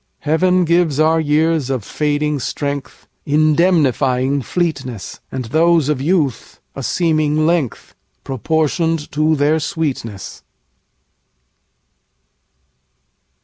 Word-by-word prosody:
Heaven 180 +4 +2
gives 170 -3 +2
our 160 +1 +3
years 155 -1 +1
of 130 -5 -2
fading 150 +3 -1
strengthIndemnifying 145 -1 0
fleetness; 135 - -3
And 130 -2 -4
those 160 +3 +2
of 145 -4 0
youth, 150 - -1 0.2
a 140 - -5
seeming 155 +2 +1
length, 160 - -1 0.3
Proportion'd 160 - -1
to 155 +2 +2
their 150 +2 +2
sweetness. 140 - -4
150 Hz, 85 wpm, -18 LUFS, 135-160 Hz, 0.3 s, our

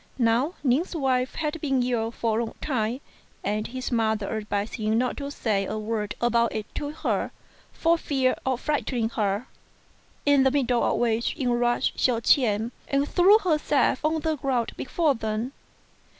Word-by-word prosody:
Now 245 +7 +2
Ning's 290 +8 +1
wife 260 -4 0
had 310 0 -3
been 270 -4 +1
ill 235 -2 0
for 230 -1 -1
a - - +1
long - - -9
time, 245 -2 -1 0.4
and 210 +1 -1
his 255 +2 -5
mother 220 -3 0
advised 210 -1 -3
him 215 0 +1
not 250 +1 0
to 280 -1 -4
say 215 -8 0
a 215 - -3
word 215 -1 -3
about 235 -1 +2
it 215 - -2
to 290 - -3
her 305 - -1 0.4
for 335 0 +2
fear 265 -4 +1
of 260 -1 -1
frighten 295 -4 -1
ing 225 -1 +1
her; 210 0 -1 0.8
in 285 -1 +5
the 265 - +5
middle 255 -3 +1
of - - +1
which 235 -1 0
in 260 -5 0
rushed 240 0 +1
Hsiao 245 -3 +3
ch'ien, 230 -2 +2 0.2
and 280 +1 +1
threw 380 +6 +6
herself 305 -8 +1
on 315 +1 +1
the 315 0 -1
ground 260 -4 -1
before 310 +2 +1
them. 220 +1 -3
245 Hz, 175 wpm, -26 LUFS, 225-285 Hz, 0.8 s, threw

